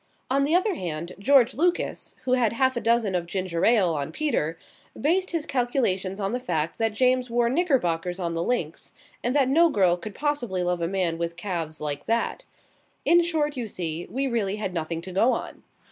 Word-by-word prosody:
On 275 +1 +3
the 310 +4 +2
other 380 +3 +2
hand, 170 - -5
George 255 +2 +4
Lucas, 345 +8 -1
who 255 - +1
had 240 -4 +2
half 260 +2 +2
a 235 - -2
dozen 230 -3 +2
of 175 -1 -1
ginger 185 -2 -2
ale 205 -8 +4
on 140 -2 -3
Peter, 225 - -1 0.4
based 365 +6 +1
his 330 -3 -2
calculations 235 -8 0
on 195 +2 -1
the 250 - -1
fact 165 -7 -2
that 225 -1 +2
James 255 +2 +2
wore 235 0 +2
knickerbockers 185 - 0
on 170 -2 -2
the 165 - -1
links, 170 -6 -2 0.3
and 245 +3 0
that 275 -3 +4
no 330 +5 +5
girl 190 - +3
could 200 +4 -8
possibly 245 -11 -1
love 180 -1 -1
a 165 - 0
man 175 -3 -1
with 170 0 -3
calves 170 -4 -4
like 145 -1 -4
that. 230 - -1 0.6
In 345 +1 +6
short, 310 -3 0
you 245 -3 -3
see, 170 -4 -4
we 270 +2 -1
really 220 -6 0
had 210 -3 -4
nothing 165 -1 -3
to 185 - -8
go 225 +7 +3
on. - - -5
215 Hz, 200 wpm, -25 LUFS, 175-265 Hz, 0.6 s, In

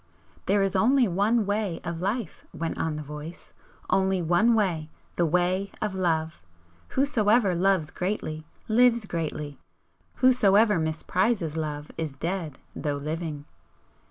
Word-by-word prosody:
"There 200 +1 +3
is 195 0 -1
only 245 +5 +4
one 205 +5 +2
Way 205 -3 -1
of 170 -1 -4
Life," 200 0 -3
went 165 0 -4
on 160 -2 -1
the 155 - -5
Voice 150 +3 -9 0.3
"Only 190 -1 +2
one 175 +8 +3
way 170 -8 0 0.3
the 170 - +2
Way 180 +4 +1
of 210 -2 -2
Love! 160 - -1 0.5
Whosoever 230 -7 +2
loves 180 -2 +1
greatly 180 -5 -3 0.2
lives 235 0 +4
greatly; 150 -5 -4 0.6
whosoever 215 -6 +4
misprizes 165 +3 0
Love 150 -2 -4
is 155 -4 -3
dead 165 -2 -3 0.2
though 145 -1 -2
living. 150 0 -4
180 Hz, 130 wpm, -26 LUFS, 160-210 Hz, 0.6 s, only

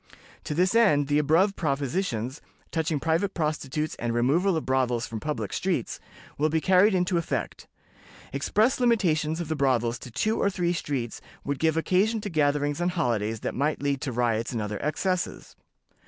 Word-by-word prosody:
To 150 - -3
this 185 +4 +2
end, 150 -12 +4
the 145 +1 +3
above 165 +7 +3
propositions, 140 - -2 0.3
touching 160 -2 0
private 165 +6 0
prostitutes 155 -2 -2
and 120 -1 -2
removal 160 +10 +2
of 160 - -4
brothels 125 -2 +1
from 115 - -6
public 115 -7 -3
streets, - - -1 0.4
will 155 +1 +3
be 160 +1 +1
carried 190 +4 +4
into 180 -1 +1
effect. 165 - -4 0.7
Express 215 - +1
limitations 170 -10 +2
of 170 - -3
the 160 - -1
brothels 120 -5 +1
to - - -9
two 215 - 0
or 200 - +2
three 175 -3 0
streets 135 -8 -3 0.2
would 140 -1 -3
give 160 0 +2
occasion 195 +7 +2
to 205 - -5
gatherings 145 0 +1
on 175 - +2
holidays 115 - -1
that - - -3
might 145 +2 -1
lead 140 -2 0
to 140 - -2
riots 115 -1 0
and 120 - -2
other 105 -1 -3
excesses. 180 +4 -2
150 Hz, 170 wpm, -26 LUFS, 130-180 Hz, 0.7 s, end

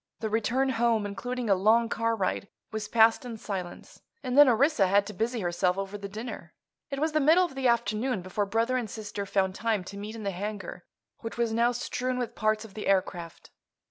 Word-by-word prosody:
The 220 -1 -3
return 240 +5 +1
home, 230 -3 +1
including 245 +4 -4
a 200 - +5
long 220 +5 +4
car 230 0 0
ride, 200 -1 -1 0.2
was 220 -1 -4
passed 225 +2 +4
in 240 -3 -6
silence, 185 -5 -7 0.2
and 255 -1 -2
then 290 -1 +8
Orissa 245 -3 +3
had 200 +2 +3
to 210 - -7
busy 225 +3 -1
herself 180 +1 0
over 195 +1 -4
the 200 -1 -6
dinner. 220 +4 -7 0.3
It 275 - -4
was 310 +3 0
the 310 - +2
middle 320 +6 +5
of 340 - -8
the 265 -1 0
afternoon 235 -2 0
before 200 +2 -2
brother 230 +5 +1
and 235 -4 -3
sister 205 -2 -5
found 190 -1 +1
time 215 -1 -1
to 200 +2 -9
meet 210 +2 -6
in 220 - -7
the 200 - -1
hangar, 205 +3 -6 0.3
which 225 0 -7
was 235 -2 0
now 235 +2 +3
strewn 250 +1 -2
with 245 -3 -3
parts 215 0 0
of 210 - -13
the 215 - -5
aircraft. 180 -4 -1
220 Hz, 210 wpm, -28 LUFS, 200-240 Hz, 0.3 s, then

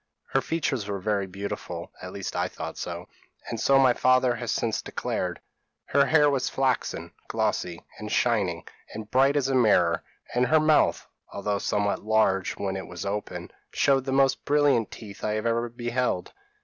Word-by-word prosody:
Her - - +3
features 135 -9 -1
were 100 -1 -2
very 100 0 -1
beautiful, 100 +2 -6
at - - -7
least - - -5
I - - +1
thought - - -6
so, - - -6 0.4
and 115 - -4
so 135 +4 +4
my 130 -2 +5
father 130 0 +3
has 120 -1 -5
since 115 -2 0
declared. - - -3 0.5
Her - - +3
hair 150 -2 +5
was 140 -3 +1
flaxen, 130 -1 -1 0.2
glossy, 85 -2 -2
and - - -6
shining, - - +1 0.3
and 110 0 -7
bright 135 +2 +4
as 140 -3 +2
a 135 - 0
mirror; 90 -9 +3 0.3
and 125 +1 +2
her 155 +5 +5
mouth, 155 0 +3 0.2
although 100 0 -2
somewhat 100 0 0
large 110 -3 +2
when 95 -1 -2
it 95 - -6
was 90 +2 -7
open, 105 +1 -4 0.2
showed 135 -2 +3
the 135 - -2
most 135 0 +3
brilliant 145 -6 +3
teeth 105 -3 -10
I 105 - 0
have 110 +1 -2
ever 115 +1 +1
beheld. 120 -4 -2
120 Hz, 175 wpm, -26 LUFS, 100-135 Hz, 0.5 s, my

